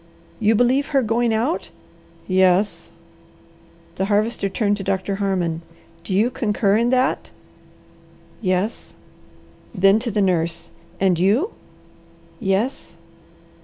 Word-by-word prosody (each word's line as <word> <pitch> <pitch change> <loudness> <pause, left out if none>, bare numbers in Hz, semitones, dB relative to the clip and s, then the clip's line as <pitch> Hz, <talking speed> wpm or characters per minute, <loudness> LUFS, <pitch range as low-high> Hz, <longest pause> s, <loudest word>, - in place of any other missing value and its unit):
"You 220 +1 +3
believe 250 +5 +2
her 275 -3 +1
going 230 +1 +1
out?" 235 +10 -1 0.6
"Yes." 185 -1 +2 1.1
The 190 - 0
Harvester 210 0 0
turned 205 0 0
to 195 - -6
Doctor 195 0 -2
Harmon. 180 -5 -1 0.4
"Do - - -8
you 225 +6 +2
concur 210 -4 +1
in 235 +2 +2
that?" 255 +1 +1 1.1
"Yes." 185 +2 -2 0.8
Then 195 +2 +4
to 235 +1 -3
the 210 -1 -1
nurse, 170 -3 -1 0.3
"And 185 -3 +2
you?" 220 - +2 0.9
"Yes." 215 +4 -2
205 Hz, 110 wpm, -21 LUFS, 190-235 Hz, 1.1 s, Then